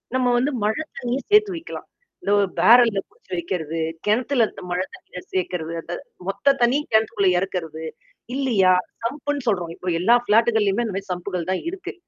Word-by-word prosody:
நம்ம 250 -1 +2
வந்து 270 +4 +1
மழை 220 +9 0 0.2
தண்ணீய 245 +2 -1
சேர்த்து 420 -3 +5
வைக்கலாம். 330 - -8 0.4
இந்த 200 - +1 0.3
பேரல்ல 230 -4 +6
புடிச்சு - - -27
வைக்கிறது, 165 -2 -3 0.3
கிணத்துலருந்த 235 0 +1
மழை 180 +1 0
தண்ணிய 180 - -11
சேர்க்கிறது. 175 -3 -2
அத 175 +1 -6 0.3
மொத்த 275 +8 +2
தண்ணீ 245 +4 +4
கிணத்துக்குள்ள 215 -3 +3
இறக்கிறது. 165 -4 -4 0.5
இல்லயா! 215 -9 +3 0.3
சம்ப்ன்னு 285 +1 -3
சொல்றோம். 175 -5 -1
இப்ப 185 - -10
எல்லா 235 +6 +5
ஃப்ளாட்டுக்களையும் 220 -1 +3
அந்த 210 - -4
மாதிரி 195 -1 -6
சம்ப்புகள் 180 -1 -4
தான் 190 - -1
இருக்கு. 380 -1 -7
210 Hz, 150 wpm, -23 LUFS, 185-245 Hz, 0.5 s, பேரல்ல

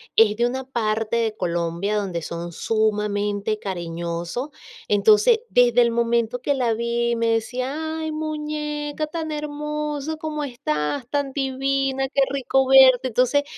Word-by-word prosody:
es 215 -2 +5
de 235 +2 +2
una 260 +2 -3
parte 225 -3 -1
de 225 -2 0
Colombia 175 +3 -1
donde 185 -5 -2
son 170 0 -5
sumamente 210 0 -1
cariñosos. 170 - -4 0.4
Entonces, 215 - +4
desde 245 -1 +4
el 235 - +1
momento 235 0 0
que 285 +2 0
la 245 -4 +1
vi, 235 +1 0
me 230 0 0
decía: 255 +8 -3
"Ay, 315 0 -3
muñeca, 300 -1 -3
tan 315 0 -5
hermosa 300 0 -3
como 305 -1 -4
estás, 240 - -2
tan 285 -2 -1
divina, 270 0 0
qué 275 -1 +1
rico 270 -1 +1
verte". 260 -1 +7
Entonces, 255 +5 +2
245 Hz, 135 wpm, -23 LUFS, 215-285 Hz, 0.4 s, verte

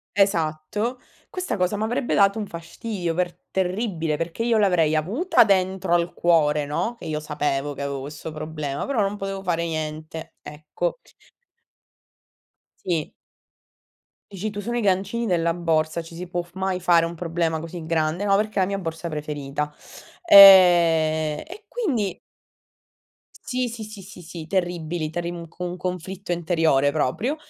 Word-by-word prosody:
Esatto, 195 +5 0 0.3
questa 365 - -3
cosa 185 +2 +1
m'avrebbe 230 +4 -1
dato 200 +2 +4
un 210 - -4
fastidio 170 +2 -5
per 175 +1 -1 0.2
terribile, 180 -5 -1
perché 165 +7 -3
io 230 -1 +2
l'avrei 175 -7 +3
avuta 225 - +3
dentro 190 -3 +1
al 175 0 +1
cuore, 150 -4 +2
no, 225 +11 -2
che - - -11
io 155 -1 -2
sapevo 145 -1 -2
che 140 - -6
avevo 140 -1 -3
questo 150 +3 -7
problema, 155 -2 -4
però 260 -6 +1
non 200 +1 0
potevo 195 -1 -5
fare 170 -2 0
niente, 155 0 -5
ecco. 155 - -4 1.9
Sì. 165 -5 -1 1.2
Dici 195 +3 -4
tu: 205 0 -6
"Sono 235 +4 -3
i 240 - 0
gancini 200 +4 0
della 170 -4 +1
borsa, 165 -1 0
ci 165 +1 -13
si 180 +2 -7
può 175 0 -2
f 175 0 -16
mai 190 -1 -2
fare 170 -2 +4
un 170 +1 -5
problema 165 -1 -1
così 165 0 -7
grande?" 160 +3 0
Ma 200 -1 +4
perché 210 +1 -1
è - - +4
la 185 - +3
mia 200 0 -2
borsa 165 -2 -5
preferita. 150 -1 -4 0.5
Ehm, 170 - +7
e 390 +6 -11
quindi 265 - -1 1.1
Sì, 255 -10 -3
sì, 230 -1 -7
sì, 215 -2 -9
sì, 190 -1 -12
sì, 165 -1 -8
terribili, 175 -3 -2
t'arriv 170 +1 -3
un 170 -1 -8
co 175 +2 -8
un 180 0 -4
conflitto 185 +1 -5
interiore 160 -5 +2
proprio. 160 - -1
175 Hz, 155 wpm, -23 LUFS, 160-195 Hz, 1.9 s, Ehm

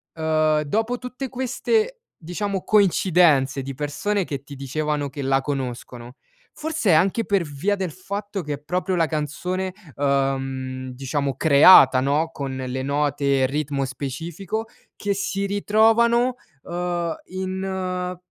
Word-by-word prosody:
uhm, 155 -1 +2
dopo 225 +11 -1
tutte 250 +2 -6
queste 435 - 0 0.3
diciamo 195 +3 -3
coincidenze 170 -9 +3
di 135 +1 -5
persone 175 +8 -1
che 140 -3 -5
ti 145 0 -10
dicevano 145 +2 -2
che 140 +2 -7
la 135 0 +2
conoscono, 125 -3 -5 0.4
forse 315 - 0
anche 195 +8 +3
per 200 -2 +2
via 160 +7 -1
del 190 -4 -3
fatto 200 +2 -5
che 150 -1 -3
è 145 - -5
proprio 180 +4 -1
la 165 -2 +2
canzone, 180 +5 -3 0.2
uhm, 135 -2 -1
diciamo 135 +1 -2
creata, 140 -2 +7
no, 145 +5 +1
con 140 -4 -5
le 130 0 -4
note 140 -1 +1
e - - +5
ritmo 140 0 -2
specifico, 165 - -5 0.3
che 205 -1 -1
si 195 0 -2
ritrovano, 225 +4 +3 0.3
uhm, 175 -1 -2
in 185 -1 -3
160 Hz, 130 wpm, -23 LUFS, 140-195 Hz, 0.4 s, creata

